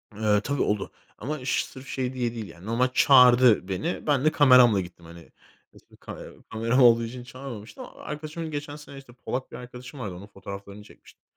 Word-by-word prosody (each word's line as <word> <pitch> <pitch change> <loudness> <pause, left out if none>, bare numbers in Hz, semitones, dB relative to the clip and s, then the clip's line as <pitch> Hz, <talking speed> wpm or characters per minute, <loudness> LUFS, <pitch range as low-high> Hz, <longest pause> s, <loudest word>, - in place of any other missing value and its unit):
Eee, 105 -1 +2
tabii 140 -1 -2
oldu 105 -1 -1 0.3
ama 145 -1 -5
ş - - 0
sırf 130 +1 -12
şey 130 -1 -3
diye 120 -2 -2
değil 110 -3 -6
yani 85 +3 -14
normal 120 +3 +1
çağırdı 125 -6 +6
beni. 95 - -3
Ben 145 -1 +2
de 155 - +5
kameramla 125 -8 +6
gittim, 85 -1 -12
hani, 85 0 -14 0.4
eski - - -21
kamera - - -10 0.2
kameram 115 +4 +1
olduğu 115 -1 +6
için 120 +2 -7
çağırmamıştı 120 -5 -9
ama - - -10
arkadaşımın 155 +2 -6
geçen 145 0 -5
sene 145 -2 -12
işte, 135 -3 -13
Polak 130 +1 -5
bir - - -9
arkadaşım 125 +2 -10
vardı. 95 -6 -5
Onun 100 +3 -11
fotoğraflarını 100 +1 -10
çekmiştim - - -19
125 Hz, 190 wpm, -26 LUFS, 105-135 Hz, 0.4 s, çağırdı